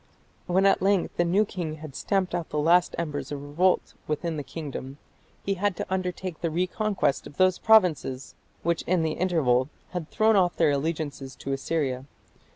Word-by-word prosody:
When 190 +2 +3
at 195 - +4
length 195 -1 +1
the 175 - +4
new 190 +5 +3
king 170 -6 -4
had 155 -3 -10
stamped 195 -3 0
out 175 -2 -2
the 150 - -3
last 170 +4 +3
embers 150 -4 -3
of 145 - -3
revolt 160 +6 +1
within 160 +2 -2
the 150 - -3
kingdom, 140 -1 -7 0.5
he 195 - +1
had 195 0 0
to - - -4
undertake 185 -2 -3
the 170 - 0
reconquest 185 -1 0
of 145 - -15
those 185 -1 +3
provinces 170 - +3 0.3
which 170 0 +1
in 175 -2 +2
the 160 - 0
interval 150 -8 +1 0.2
had 175 -4 -4
thrown 220 0 +3
off 180 -3 +3
their 160 -3 +3
allegiance 145 -2 -3
to 135 - -4
Assyria. 135 -2 -2
170 Hz, 175 wpm, -26 LUFS, 145-185 Hz, 0.5 s, at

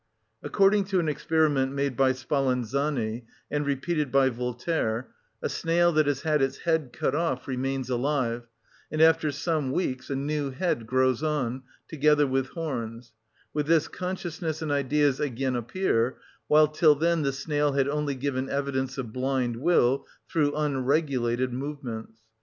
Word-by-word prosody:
According 200 0 +3
to 190 -1 +1
an 165 - 0
experiment 150 -3 +1
made 140 -2 -1
by 130 +1 +3
Spallanzani 130 -2 -1 0.3
and 145 0 -1
repeated 145 +1 -1
by 135 -1 +4
Voltaire,(35) 125 0 -2 0.4
a - - 0
snail 175 +1 +2
that 155 -2 +3
has 140 -1 0
had 155 -2 +2
its 135 0 0
head 160 -5 +1
cut - - -1
off 150 -5 -1
remains 135 0 -2
alive, 125 -2 -1 0.4
and 155 - -2
after 160 -1 +5
some 150 -1 -1
weeks 130 -5 -2
a 140 - -1
new 145 +1 -1
head 130 -5 -2
grows 130 +1 +2
on, 135 -5 -1 0.3
together 150 -1 +3
with 135 -1 0
horns; 120 -8 -5 0.4
with 150 -1 -1
this 160 -1 +3
consciousness 170 -4 -4
and 155 - -2
ideas 145 0 +2
again 130 -2 -1
appear; 120 -1 0 0.3
while 155 0 +6
till 155 0 +4
then 165 +2 +1
the 140 -2 +1
snail 145 +1 0
had 135 -1 +2
only 145 -1 -1
given 130 0 -2
evidence 135 -1 -2
of 120 -5 -5
blind 130 -2 0
will 135 -2 +2 0.2
through 145 -3 +1
unregulated 135 -4 0
movements. 125 -5 -6
140 Hz, 150 wpm, -27 LUFS, 130-155 Hz, 0.4 s, while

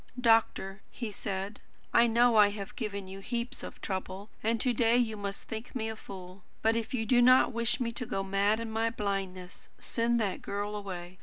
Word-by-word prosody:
"Doctor," 225 -5 +2
he 230 -3 -5
said, 200 0 -4 0.3
"I 235 0 +6
know 235 +1 +4
I 210 -1 +7
have 205 -1 -7
given 200 -6 -4
you 190 +1 -8
heaps 235 +4 -3
of - - -8
trouble, 190 +1 -4
and 225 +1 +1
to 250 +2 +2
day 230 +1 +4
you 230 -3 +1
must 200 -1 -5
think 220 +3 -7
me 220 -3 -1
a 220 - -4
fool. 190 -2 -10 0.2
But 225 +1 +4
if 230 +1 -2
you 225 -3 -1
do 245 +2 +4
not 255 +1 +6
wish 235 +1 +1
me 235 -2 -1
to 235 0 -5
go 195 - -1
mad 200 +3 +2
in 230 -1 -4
my 225 +1 +1
blindness, 195 -4 -4
send 235 +1 +1
that 200 -4 -1
girl 205 +1 -3
away. 185 -3 -6
215 Hz, 205 wpm, -30 LUFS, 195-230 Hz, 0.3 s, I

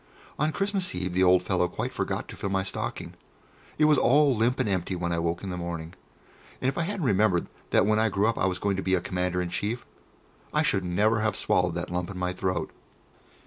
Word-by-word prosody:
On 150 +2 +2
Christmas 195 - -1
Eve 90 0 -3
the 95 +1 +3
old 90 0 +5
fellow 90 -1 +1
quite 90 - -4
forgot - - -2
to - - -7
fill 100 - -3
my 95 0 0
stocking. 95 - -4 0.6
It 155 - +4
was 150 -2 +5
all 140 +1 +4
limp 120 +4 +1
and 130 - +1
empty 95 -1 -1
when 85 -1 -2
I 85 - 0
woke 85 +2 -2
in 95 - -4
the 90 - -4
morning, 85 -1 -5 0.7
and - - -1
if 135 - 0
I - - 0
hadn't 185 -1 -2
remembered 100 -5 +3 0.2
that - - +4
when 110 +1 +3
I 110 0 +3
grew 100 +1 +1
up 115 0 +1
I - - +2
was 90 -1 -1
going 100 0 -1
to - - -1
be 95 0 +2
a - - +1
Commander 90 0 -1
in 85 - -4
Chief, 110 +6 -2 0.7
I - - +4
should 95 - +1
never 105 +5 +2
have 110 0 0
swallowed 90 -2 +1
that 85 0 -4
lump 90 +1 -2
in 100 - -7
my 90 0 -1
throat. 90 0 -2
95 Hz, 235 wpm, -27 LUFS, 90-110 Hz, 0.7 s, old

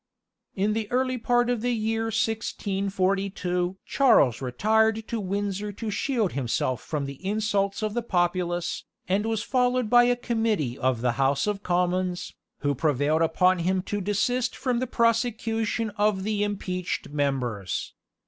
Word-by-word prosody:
In 205 +2 +1
the 215 -1 -2
early 255 0 +1
part 240 +1 +2
of 245 -3 0
the 245 +1 0
year 225 0 -1
1642 195 -4 -1
Charles 140 - +4
retired 220 - +1
to 230 - -2
Windsor 200 +1 -2
to 215 +1 -4
shield 225 - 0
himself 130 -1 -1
from 150 -3 -3
the 140 +4 -8
insults 200 0 0
of 215 -1 -1
the 240 - 0
populace, 175 -4 -1 0.2
and 200 +4 +1
was 225 -1 -1
followed 250 -3 +1
by 240 0 +7
a 245 0 +3
committee 225 - -1
of 130 -3 0
the 125 0 +2
House 135 +1 +2
of 205 -1 -2
Commons, 180 0 -1 0.3
who 145 -1 +1
prevailed 150 +2 +1
upon 180 +3 +3
him 185 +2 0
to 205 +1 -3
desist 240 +6 0
from 250 -3 -1
the 255 - -2
prosecution 230 -1 0
of 205 -2 +2
the 210 0 0
impeached 185 -3 -3
members. 130 - -2
200 Hz, 150 wpm, -26 LUFS, 175-225 Hz, 0.3 s, by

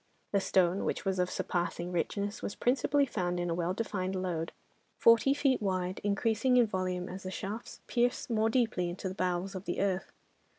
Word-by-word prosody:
The 200 - +3
stone, 185 0 +2
which - - -2
was 190 -1 0
of 180 0 +2
surpassing 175 0 -2
richness, 200 +4 -2
was - - -4
principally 275 +3 +2
found 180 -8 -2
in 175 -1 -1
a - - +2
well 175 +2 -1
defined 195 -4 -2
lode, 175 -3 -2 0.5
forty 230 +3 +6
feet 275 -3 +2
wide, 185 -2 -1
increasing 225 +5 +2
in 245 - +6
volume 185 -3 -2
as 185 +2 -7
the 185 - -5
shafts 205 +4 -6
pierced 245 +1 +1
more 225 -1 +2
deeply 225 -7 +1
into 180 +2 -4
the 185 - -4
bowels 185 +1 -1
of 190 0 -6
the 175 - -2
earth. 190 -1 0
190 Hz, 185 wpm, -31 LUFS, 180-225 Hz, 0.5 s, forty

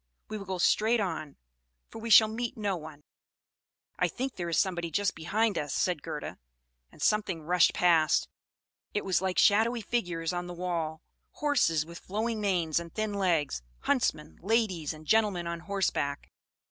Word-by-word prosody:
We 215 - -4
will 195 - -8
go 190 -1 -3
straight 220 +6 +3
on, 160 -7 -3 0.5
for - - -8
we 230 - -4
shall 220 0 +8
meet 230 +2 -4
no 205 -3 -1
one." 155 -3 -10 1.0
"I - - +3
think 265 0 -4
there 175 -1 -4
is 165 - 0
somebody 175 -3 0
just 200 +5 0
behind 205 +5 0
us," 145 -2 -3
said 180 -5 0
Gerda; - - -6 0.5
and - - -18
something 200 -6 0
rushed 175 +2 +3
past: 165 -3 +3 0.7
it 205 - -1
was 185 -2 +1
like 190 -1 -1
shadowy 225 +3 +4
figures 180 -7 -2
on 175 0 -3
the 175 - -7
wall; 170 -3 -3 0.3
horses 245 - +1
with 170 +1 -10
flowing 220 +3 -2
manes 175 -6 +1
and 170 -1 -8
thin 215 -1 -2
legs, 170 - 0 0.2
huntsmen, 80 - 0
ladies 195 -7 0
and 155 0 -11
gentlemen 210 -3 +2
on 170 0 -3
horseback. 170 -6 -2
180 Hz, 165 wpm, -29 LUFS, 165-215 Hz, 1.0 s, shall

